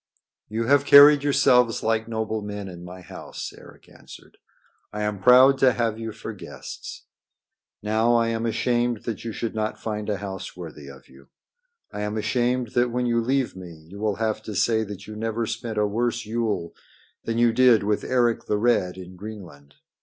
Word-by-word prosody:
"You 110 +2 -2
have 140 +3 +3
carried 145 0 +8
yourselves 125 -4 +3
like 110 0 0
noble 110 -1 -3
men 105 -1 -6
in 90 -2 -10
my 90 +1 -10
house," 95 +1 -8
Eric - - -16
answered. - - -16 0.5
"I 105 0 -4
am 105 -2 -3
proud 130 +4 +6
to 130 -2 +5
have 115 -1 -1
you 115 0 -5
for 110 - -8
guests. - - -9 0.8
Now 110 +3 +2
I 115 -1 +2
am 115 0 -2
ashamed 120 0 0
that 115 -3 -5
you 115 - -4
should 115 +1 -4
not 110 0 -3
find 105 -1 -4
a 105 - -1
house 95 -2 -7
worthy 75 -5 -9
of 70 -1 -13
you. 70 +1 -19 0.6
I 105 - -6
am 105 +1 -3
ashamed 125 +2 0
that 120 +1 +1
when 125 +1 -1
you 115 -1 +1
leave 130 0 0
me 85 -4 -11
you 100 - -9
will 105 -1 0
have 110 -1 -2
to 110 -1 -7
say 110 +3 +2
that 100 -1 -9
you 110 - -9
never 115 +1 -2
spent 115 0 -5
a 105 - +2
worse 120 +3 -1
Yule 110 -6 -2 0.5
than 115 0 -2
you 120 -1 +3
did 125 -4 +5
with 105 0 0
Eric 120 -2 +1
the 105 - 0
Red 105 -5 +1
in 90 0 -10
Greenland. 90 -9 -11
110 Hz, 190 wpm, -24 LUFS, 105-120 Hz, 0.8 s, carried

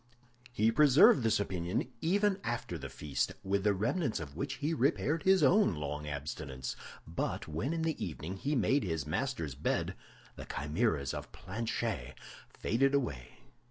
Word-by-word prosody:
He 110 -1 +3
preserved 140 +1 +7
this 110 -2 +2
opinion 95 - -2
even 195 +3 +2
after 120 -1 -3
the - - -6
feast, 75 -2 -2
with 100 0 0
the 105 -1 +3
remnants 120 - 0
of 70 -3 -7
which 140 - -3
he 150 +3 -1
repaired 150 +2 +1
his 190 +2 +4
own 200 - +5
long 75 0 -4
abstinence; 70 -3 -5 0.3
but - - -3
when 80 - -2
in 165 -1 -1
the 160 -2 -1
evening 85 +2 -5
he 145 +9 -1
made 135 +1 +2
his 80 -7 -2
master's 85 - -2
bed, 70 +4 -1 0.4
the - - -7
chimeras 75 - -1
of - - -6
Planchet 110 - -3 0.3
faded 135 +5 +1
away. 70 - -3
110 Hz, 155 wpm, -32 LUFS, -, 0.4 s, preserved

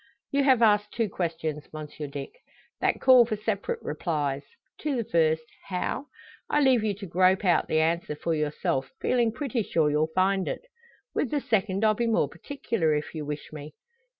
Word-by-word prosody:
"You 280 0 +2
have 255 -4 +5
asked 210 -1 +4
two 230 -3 0
questions, 165 -4 -3
Monsieur 155 -1 -7
Dick, 140 -1 -6 0.5
that - - +1
call 255 -2 +7
for 225 -2 -2
separate 210 -1 -3
replies. 145 -3 -2 0.4
To 300 -3 -1
the 235 - 0
first, 160 -4 +2 0.3
`How?' 195 +9 -2 0.4
I 295 - +3
leave 260 -5 +4
you 210 -2 0
to 200 +1 -8
grope 185 +2 +3
out 175 - +3
the 155 - +2
answer 160 -1 0
for 165 +3 -2
yourself, 150 -3 -1
feeling 240 -2 +2
pretty 245 -1 -2
sure 160 -7 +1
you'll 150 +1 +2
find 190 0 +2
it. - - -4 0.5
With 270 - 0
the 295 - 0
second 215 -5 0
I'll 215 - +5
be 235 +2 -1
more 220 -10 +2
particular, 170 - -1
if 150 0 -3
you 155 -3 -5
wish 150 +1 -6
me. 150 0 -9
185 Hz, 180 wpm, -27 LUFS, 155-225 Hz, 0.5 s, call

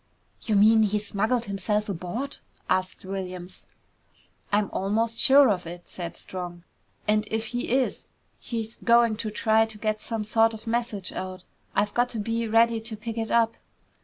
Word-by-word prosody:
"You 215 - 0
mean 220 +2 +6
he 210 -1 +2
smuggled 220 +4 0
himself 210 +2 -1
aboard?" 200 +9 -4 0.3
asked 185 0 -1
Williams. 185 -2 -6 0.8
"I'm 205 -1 +1
almost 225 +4 0
sure 280 -1 +7
of 180 -4 -2
it!" 175 +1 -9
said 170 -2 -7
Strong. 175 -2 -7 0.4
"And 210 0 +2
if 220 0 -1
he 245 - -2
is, 260 +1 0 0.3
he's 225 -2 -5
going 235 -1 +4
to 215 0 -3
try 220 +1 +3
to 220 -1 -11
get 215 0 -1
some 225 -2 -3
sort 225 +1 +3
of 220 - -11
message 230 -4 -2
out. 185 -1 -6 0.3
I've 205 0 +1
got 245 +1 +2
to 230 - -4
be 230 +2 -1
ready 230 +1 +4
to 220 0 -6
pick 225 +1 -5
it 225 -1 -2
up." 230 -1 +2
220 Hz, 165 wpm, -26 LUFS, 195-230 Hz, 0.8 s, sure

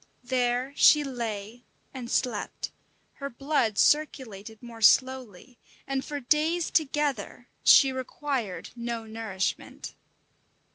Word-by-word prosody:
There 250 +1 0
she 300 0 +6
lay 235 -3 -5 0.3
and 250 -3 -7
slept, 245 -5 -2 0.5
her 280 0 -5
blood 245 -5 0
circulated 225 -8 0
more 230 -1 -10
slowly, 255 -2 +2 0.3
and 270 0 -2
for 290 -1 -5
days 310 +6 +1
together 280 -6 -1
she 270 - +7
required 260 -5 -4
no 235 -1 -4
nourishment. 220 -4 -4
250 Hz, 100 wpm, -27 LUFS, 225-275 Hz, 0.5 s, she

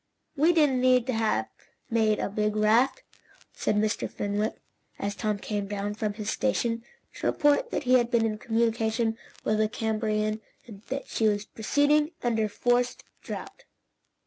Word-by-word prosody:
"We 315 +4 +4
didn't 295 -6 +3
need 255 -1 +4
to 255 - -1
have 225 -1 +1 0.4
made 220 -2 +2
the - - -1
big 210 +1 -1
raft," 230 - +3 0.5
said - - 0
Mr. 215 +1 0
Fenwick, 205 +2 -2 0.4
as 200 0 -2
Tom 215 -1 -1
came 205 0 -3
down 205 0 -3
from 210 -1 -2
his 215 -1 -3
station, 235 -3 0 0.3
to - - -3
report 295 +12 +3
that - - -2
he 255 0 +5
had 235 -1 0
been 235 -2 +2
in 215 -1 -2
communication 225 0 0 0.3
with 215 0 +1
the 215 0 +2
Camabarian 215 -1 -1 0.2
and 205 -4 -12
that 270 +2 -3
she 220 - +1
was 205 0 0
proceeding 290 +8 +2
under 225 -3 +1
forced 245 +3 0 0.2
draught. - - -8
225 Hz, 160 wpm, -27 LUFS, 215-250 Hz, 0.5 s, he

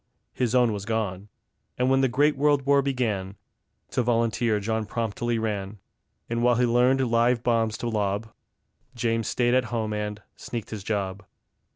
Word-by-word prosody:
his 125 -1 0
own 120 -3 +4
was 100 -2 -4
gone. 105 -3 -3 0.5
And 125 +1 +2
when 135 0 +4
the 135 - +4
great 145 +4 +2
World 145 -1 +2
War 140 0 +4
began, 110 -8 -2 0.6
To - - +1
volunteer 115 -2 +1
John 110 +1 -2
promptly 115 +1 -2
ran; 105 -2 -3 0.5
And 115 0 -2
while 120 0 +4
he 125 +1 +3
learned 125 +3 +3
live 120 +1 +3
bombs 115 -2 +1
to 120 - -4
lob, 105 0 -2 0.6
James 115 -1 0
stayed 120 -1 +1
at 130 0 +3
home 110 -2 -2
and 105 0 -4
sneaked 115 -3 -6
his 105 -3 -6
job. 100 -1 -2
115 Hz, 165 wpm, -26 LUFS, 105-125 Hz, 0.6 s, own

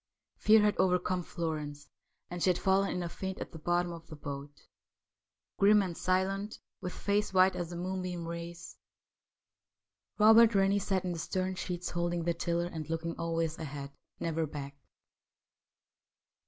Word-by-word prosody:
Fear 215 0 +6
had 210 -1 +3
overcome 180 0 +2
Florence, 150 -4 -4 0.4
and 175 0 -6
she 185 - +4
had 180 - +3
fallen 195 +1 +2
in 180 - -2
a - - -2
faint 190 +2 -5
at - - -6
the 160 - -9
bottom 175 +2 +1
of 165 -1 -9
the 155 - -9
boat. 145 -1 -8 0.9
Grim 205 +1 +6
and 180 -3 -4
silent, 195 +4 0 0.2
with 180 -1 -3
face 205 +2 0
white 185 +1 +5
as 175 -2 -3
the 175 - -6
moonbeam 180 -1 -3
rays, 170 0 -7 1.4
Robert 220 +1 +7
Rennie 195 +1 +4
sat 190 -1 -1
in 180 - -1
the 170 - -4
stern 185 +3 -1
sheets 180 -1 -4
holding 175 0 -1
the 170 +1 +1
tiller 170 0 -1
and 160 -3 -6
looking 165 +1 -2
always 165 -1 -1
ahead, 140 -3 -6 0.3
never 165 -1 -1
back. 140 -1 -7
175 Hz, 155 wpm, -31 LUFS, 165-190 Hz, 1.4 s, Robert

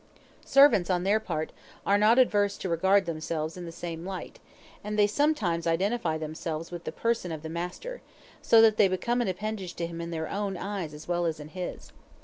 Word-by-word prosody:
Servants, 275 -11 +6
on 180 -1 +1
their 205 +3 +3
part, 155 -7 -3 0.3
are 200 - +4
not 215 +3 +5
averse 205 -5 +3
to - - -4
regard 190 +3 +3
themselves 160 -1 -3
in 180 -1 -7
the 165 - -7
same 165 0 -6
light; 190 0 -7 0.4
and 210 +1 -3
they 205 - +6
sometimes 205 - +1
identify 170 0 0
themselves 160 +1 -5
with 175 -1 -7
the - - -3
person 230 -6 -1
of 160 -1 -6
the 160 - -5
master, 180 - -5 0.4
so 225 -1 +6
that 220 -1 +5
they 205 - +6
become 235 +6 0
an 240 - 0
appendage 190 -1 -4
to 170 - -2
him 170 0 -6
in 170 - -5
their 160 -1 -3
own 200 -2 -3
eyes 190 -6 -4
as 150 - -11
well 175 -1 0
as 160 -1 -3
in 150 0 -9
his. 180 +1 -6
180 Hz, 205 wpm, -28 LUFS, 165-210 Hz, 0.4 s, Servants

